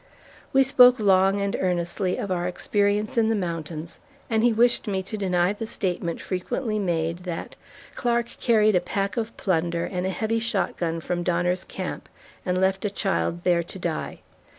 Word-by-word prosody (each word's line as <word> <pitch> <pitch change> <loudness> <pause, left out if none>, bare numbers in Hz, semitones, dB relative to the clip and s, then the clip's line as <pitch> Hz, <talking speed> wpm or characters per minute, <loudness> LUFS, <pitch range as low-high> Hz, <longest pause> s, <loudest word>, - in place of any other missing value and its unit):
We 270 0 +5
spoke 250 -2 +6
long 195 -1 +4
and 200 0 -1
earnestly 180 +1 -1
of 200 - -3
our 175 -1 0
experience 205 +4 0
in 220 -1 +3
the 225 - +2
mountains, 165 -3 -4 0.3
and 220 0 +2
he 240 - +5
wished 235 +1 +2
me 190 -2 -1
to 200 +3 -6
deny 185 -2 +1
the 220 +2 -6
statement 175 -5 -2
frequently 215 +4 -2
made 170 -3 -1
that, 180 -2 -6 0.4
"Clark 235 -1 0
carried 215 -3 +4
a 180 - +4
pack 195 +3 -2
of 230 -1 -3
plunder 170 -2 0
and 180 -1 -2
a - - 0
heavy 220 +4 -1
shotgun 180 -7 -1
from 175 +2 -2
Donner's 175 +1 0
Camp - - -6 0.4
and 180 0 +1
left 190 0 +1
a 210 - +1
child 190 -3 -1
there 175 -1 +3
to 170 - -9
die." 170 -4 -4
190 Hz, 175 wpm, -25 LUFS, 175-215 Hz, 0.4 s, spoke